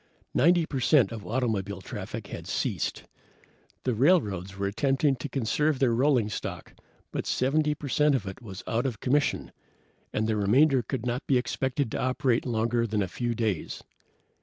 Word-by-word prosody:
Ninety 170 +3 +4
percent 130 -5 +3
of 110 -3 -7
automobile 105 -5 -1
traffic 95 - -6
had - - -8
ceased. - - -2 0.8
The 125 - +1
railroads 105 - +2
were 100 - -1
attempting 135 +7 +1
to 125 - -5
conserve 145 +4 +1
their 125 -3 +2
rolling 125 -2 +3
stock, 105 - -6 0.4
but - - -3
70 150 +3 +1
percent 150 0 +2
of 120 - -2
it 95 +5 -7
was 95 -5 -8
out 120 +4 0
of 115 -5 -4
commission, 140 +3 0 0.6
and 110 - 0
the 110 0 +1
remainder 130 +7 +4
could 120 +1 -4
not 125 +2 -2
be 135 - +4
expected 130 0 -1
to - - -2
operate 130 -1 +1
longer 115 0 +1
than 105 -1 0
a - - -2
few 120 +5 -2
days. 110 -7 -2
125 Hz, 160 wpm, -27 LUFS, 110-140 Hz, 0.8 s, Ninety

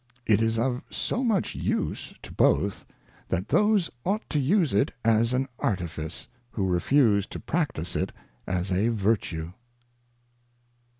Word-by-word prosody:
It 110 -1 +4
is 115 0 +1
jjf 125 +2 0
so 255 - -1
much 220 -7 +1
use - - -2
to - - -9
both, 100 0 +2 0.4
that 95 +4 -2
those 210 -4 +3
ought 205 +5 -1
to 150 - +1
use 160 - +2
it 100 - +2
as 115 +1 +3
an 130 +1 0
Artifice, 85 -5 -3 0.3
whyo 95 -3 0
refuse 105 0 +3
to - - -7
practise 130 - -2
it - - -1 0.4
as 90 +1 -1
a 95 +5 +2
Vertue. 95 -7 0
115 Hz, 135 wpm, -27 LUFS, 95-145 Hz, 0.4 s, It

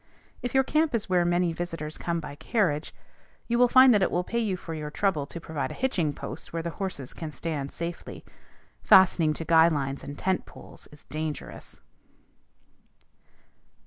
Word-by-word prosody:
If 245 +1 -4
your 265 - +5
camp 305 0 +1
is 215 -4 -2
where 180 -1 +3
many 175 0 +1
visitors 165 -2 -5
will - - -11
come 170 -1 0
by 150 -3 -7
carriage, 155 -1 -1 0.6
you 235 0 +1
will 245 - +6
find 255 +1 +7
that 205 - +3
it - - +3
will 175 - 0
pay 235 +6 -2
you 205 -5 -1
for 165 - -7
your 150 -1 -5
trouble 150 -4 0
to 170 - -7
provide 160 -2 -4
a - - -7
hitching 180 - 0
post 145 +1 -8
where 165 0 -3
the 170 - -3
horses 170 -9 -5
can 160 -2 -6
stand 145 -1 -4
safely. 170 0 -6 0.6
Fastening 175 -4 +5
to 165 - -6
guy 165 0 +6
lines 140 -4 -2
and 145 0 -7
tent 190 -1 -1
poles - - -14
is 150 - -15
dangerous. 155 0 -6
170 Hz, 180 wpm, -27 LUFS, 150-195 Hz, 0.6 s, find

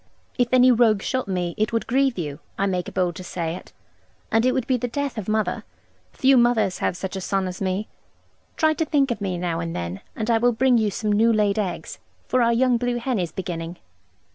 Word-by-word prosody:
If 245 - +4
any 255 0 +6
rogue 225 -4 +3
shot 260 -4 -1
me 180 -3 -2
it 215 - +1
would 230 -1 -1
grieve 265 0 +1
you; 150 -4 -4 0.2
I 195 - +1
make 180 -2 -2
bold 180 -2 0
to 185 - -7
say 170 -2 -3
it, 185 - -11 0.6
and 225 +3 +3
it - - +4
would 255 -2 -1
be 260 -1 +1
the 245 0 -2
death 280 +2 -3
of 215 -3 -5
mother. 215 -1 0 0.5
Few 265 0 +4
mothers 225 -6 +2
have 175 - -1
such 190 +2 -5
a 190 - -4
son 195 0 -1
as 180 +1 -7
me. 190 +2 -1 0.7
Try 315 0 +3
to 320 +1 -1
think 280 -4 +2
of 225 - -3
me 185 -3 -2
now 170 -2 -2
and 165 0 -4
then, 85 +2 -4
and 220 +1 -1
I 225 - +3
will 245 +1 +3
bring 245 +1 +3
you 215 -1 +1
some 210 +1 -2
new 225 +3 +4
laid 210 -1 +2
eggs, 195 -4 -4 0.3
for 255 - +2
our 235 0 +4
young 245 +1 +3
blue 245 0 -1
hen 240 -2 -1
is 175 -3 -2
beginning.' 170 -1 -5
215 Hz, 230 wpm, -23 LUFS, 185-245 Hz, 0.7 s, any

